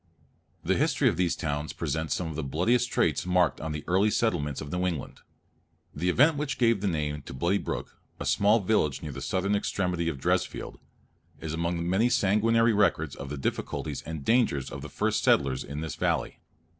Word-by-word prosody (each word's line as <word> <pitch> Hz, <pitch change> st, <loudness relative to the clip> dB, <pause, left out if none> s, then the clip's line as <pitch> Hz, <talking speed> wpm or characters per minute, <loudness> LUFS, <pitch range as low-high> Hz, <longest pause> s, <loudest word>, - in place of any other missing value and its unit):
The -, -, +1 dB
history -, -, +2 dB
of -, -, -1 dB
these 90 Hz, -2 st, +1 dB
towns 75 Hz, 0 st, -3 dB
presents 80 Hz, 0 st, -2 dB
some 90 Hz, -, -3 dB
of 80 Hz, -2 st, -5 dB
the 80 Hz, -, -2 dB
bloodiest 115 Hz, -, +1 dB
traits -, -, +1 dB
marked 90 Hz, -4 st, +2 dB
on 80 Hz, 0 st, -3 dB
the 75 Hz, -1 st, -4 dB
early 95 Hz, +4 st, +3 dB
settlements 85 Hz, -, 0 dB
of 75 Hz, -1 st, -7 dB
New 90 Hz, +1 st, 0 dB
England. 80 Hz, -7 st, -4 dB, 0.7 s
The 90 Hz, +5 st, -1 dB
event 145 Hz, -, +4 dB
which 145 Hz, -1 st, -2 dB
gave 115 Hz, -5 st, +3 dB
the 100 Hz, -, 0 dB
name 75 Hz, -4 st, -2 dB
to 65 Hz, -, -9 dB
Bloody 85 Hz, +8 st, +1 dB
Brook, -, -, -5 dB, 0.2 s
a -, -, -4 dB
small 105 Hz, +3 st, +3 dB
village 90 Hz, -8 st, +1 dB
near -, -, -5 dB
the -, -, -7 dB
southern 95 Hz, +2 st, 0 dB
extremity 90 Hz, -4 st, -1 dB
of 75 Hz, -, -4 dB
Dresfield, -, -, -1 dB, 0.6 s
is 80 Hz, -1 st, -5 dB
among 85 Hz, +1 st, -1 dB
many 100 Hz, +7 st, +3 dB
sanguinary 115 Hz, +3 st, +3 dB
records 85 Hz, -8 st, +1 dB
of 70 Hz, -, -7 dB
the 75 Hz, -, -4 dB
difficulties 65 Hz, -, -3 dB
and 80 Hz, -3 st, -7 dB
dangers 115 Hz, -, +2 dB
of -, -, -6 dB
the -, -, -7 dB
first -, -, 0 dB
settlers 65 Hz, -2 st, +2 dB
in 75 Hz, +1 st, -6 dB
this 80 Hz, -2 st, -4 dB
valley. -, -, -1 dB
85 Hz, 195 wpm, -28 LUFS, 75-105 Hz, 0.7 s, event